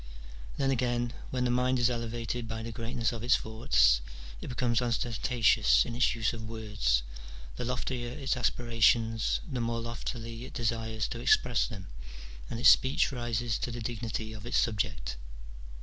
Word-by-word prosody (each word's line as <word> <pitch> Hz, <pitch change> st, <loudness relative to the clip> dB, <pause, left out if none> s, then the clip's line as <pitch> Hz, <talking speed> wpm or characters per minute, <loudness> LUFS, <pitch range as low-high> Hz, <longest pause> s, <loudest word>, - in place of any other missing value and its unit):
Then 135 Hz, -1 st, +2 dB
again, 120 Hz, -1 st, 0 dB, 0.2 s
when 125 Hz, -1 st, -1 dB
the 125 Hz, -, +2 dB
mind 125 Hz, +1 st, +2 dB
is 120 Hz, 0 st, +3 dB
elevated 115 Hz, 0 st, -3 dB
by 115 Hz, 0 st, -5 dB
the 115 Hz, -, -5 dB
greatness 115 Hz, +1 st, -2 dB
of 115 Hz, -2 st, -6 dB
its 125 Hz, +3 st, +4 dB
thoughts, -, -, +3 dB, 0.4 s
it -, -, -7 dB
becomes 120 Hz, -1 st, 0 dB
osten 120 Hz, 0 st, -1 dB
tatious 105 Hz, -, +4 dB
in -, -, -5 dB
its 125 Hz, +1 st, +2 dB
use 115 Hz, -1 st, 0 dB
of 110 Hz, -2 st, -7 dB
words, 105 Hz, -, 0 dB, 0.5 s
the -, -, -4 dB
loftier 125 Hz, 0 st, -2 dB
its 135 Hz, +1 st, -2 dB
aspirations, 115 Hz, -2 st, +2 dB
the 130 Hz, -6 st, -3 dB
more 115 Hz, 0 st, -1 dB
loftily 115 Hz, 0 st, -5 dB
it -, -, -11 dB
desires 110 Hz, -1 st, -1 dB
to 115 Hz, -, -5 dB
express 120 Hz, 0 st, +3 dB
them, 100 Hz, -5 st, -8 dB, 0.6 s
and 115 Hz, -, -4 dB
its 125 Hz, 0 st, +8 dB
speech 135 Hz, +1 st, +4 dB
rises 120 Hz, -2 st, -2 dB
to -, -, -2 dB
the 120 Hz, 0 st, -5 dB
dignity 110 Hz, -1 st, -4 dB
of 110 Hz, -1 st, -9 dB
its -, -, +1 dB
subject. 60 Hz, -, -1 dB
115 Hz, 165 wpm, -30 LUFS, 110-120 Hz, 0.6 s, its